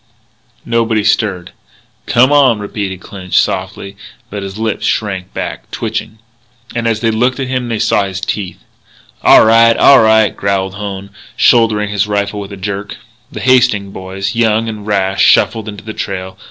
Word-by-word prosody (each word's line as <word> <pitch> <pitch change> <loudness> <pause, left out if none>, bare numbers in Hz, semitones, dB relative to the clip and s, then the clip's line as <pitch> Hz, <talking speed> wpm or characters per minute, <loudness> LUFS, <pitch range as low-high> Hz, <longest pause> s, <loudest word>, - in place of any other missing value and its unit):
Nobody 115 -2 0
stirred. 100 -4 0 0.6
"Come 125 +4 +4
on," 135 -6 +4
repeated 100 -2 -5
Clinch 90 -1 -4
softly. 95 +1 -2 0.4
But 105 0 -5
his 95 +1 -7
lips 110 -1 -3
shrank 95 -4 -2
back, - - -6
twitching. 110 - -5 0.6
As 115 -2 -1
they 115 -1 +1
looked 125 +4 0
at 135 - -2
him 125 -2 -2
they 115 - -1
saw 105 -1 +1
his 95 -1 -5
teeth. 100 -2 -5 0.6
"All - - +6
right, 115 +1 +5
all 140 - +7
right," 110 -1 +3
growled 95 -1 -1
Hone, 100 -1 -7 0.3
shouldering 110 -4 +3
his 105 0 0
rifle 105 0 -2
with 100 0 -8
a 100 - -8
jerk. 100 +1 -5 0.3
The - - -7
Hastings 120 -6 +2
boys, 95 +3 -5
young 115 -1 +1
and 105 -2 -7
rash, 95 -2 +1
shuffled 110 -1 +3
into 105 -1 -9
the 110 - -7
trail. 95 -2 -5
105 Hz, 160 wpm, -14 LUFS, 95-115 Hz, 0.6 s, all